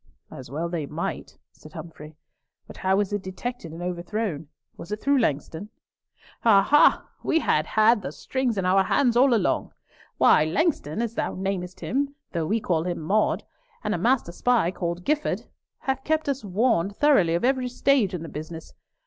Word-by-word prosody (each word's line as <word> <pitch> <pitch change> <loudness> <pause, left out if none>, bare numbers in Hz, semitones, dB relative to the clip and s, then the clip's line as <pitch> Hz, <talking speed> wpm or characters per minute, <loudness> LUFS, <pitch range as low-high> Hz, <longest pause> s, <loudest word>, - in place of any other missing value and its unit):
"As 130 - -10
well 155 +5 -3
they 165 -4 -3
might," - - -5
said - - -16
Humfrey. 155 -2 -10 0.5
"But - - -12
how 190 0 +1
was 205 0 0
it 205 - -1
detected 190 0 -6
and 165 +2 -7
overthrown? 180 -2 -3 0.3
Was 170 - -10
it 210 - -2
through 280 +2 +2
Langston?" 160 - -2 0.7
"Ah, 200 -4 +6
ha! 295 +8 +4
we 325 - +1
had 155 - +1
had 220 0 +4
the 160 - -5
strings 250 - -2
in 190 - -1
our 190 +1 +4
hands 240 +4 +2
all 260 +2 +5
along. 225 -5 +1 0.4
Why, - - +5
Langston, 220 - 0
as 230 -1 -3
thou - - -2
namest 185 -1 -4
him, 280 +2 -1 0.2
though 165 -3 -2
we 220 +6 +1
call 165 -6 0
him 175 -1 -2
Maude, 200 +7 +1 0.4
and - - -1
a - - -2
master 240 -7 +1
spy 230 -2 +1
called 175 -1 -4
Gifford, 300 +1 0 0.4
have 265 0 -2
kept 315 0 0
us 275 -3 -1
warned 200 -1 +1
thoroughly 205 - +4
of 170 - 0
every 260 -1 +1
stage 245 -6 +2
in 170 - -5
the - - -7
business. 160 +2 -8
195 Hz, 180 wpm, -25 LUFS, 170-245 Hz, 0.7 s, Ah